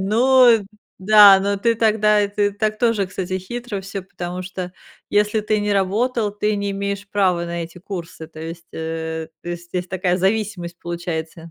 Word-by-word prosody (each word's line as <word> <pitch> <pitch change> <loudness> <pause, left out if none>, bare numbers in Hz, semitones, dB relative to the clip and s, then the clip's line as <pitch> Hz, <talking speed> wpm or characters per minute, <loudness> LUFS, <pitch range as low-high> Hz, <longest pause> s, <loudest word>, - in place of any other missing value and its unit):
Ну 235 +1 +4 0.3
да, 200 0 +8
но 200 +1 0
ты 230 +3 +1
тогда, 215 -1 +3
это 205 0 0
так 215 +1 -1
тоже, 230 -5 +1
кстати, 185 0 -4
хитро 220 +1 -5
всё, 195 0 -6
потому 180 -1 -6
что, 185 -1 -6 0.4
если 210 +1 +2
ты 215 0 0
не 205 0 0
работал, 210 +3 0
ты 210 0 -1
не 200 0 -2
имеешь 200 0 -4
права 185 -4 +1
на 170 0 -4
эти 165 +2 -10
курсы, 170 -3 -7
то 155 0 -12
есть, 165 +1 -8
э, 160 0 -4
то 175 - -8
есть 175 0 -6
здесь 180 0 -3
такая 180 -1 0
зависимость 190 -2 -1
получается. 170 -1 -5
195 Hz, 170 wpm, -21 LUFS, 175-210 Hz, 0.4 s, да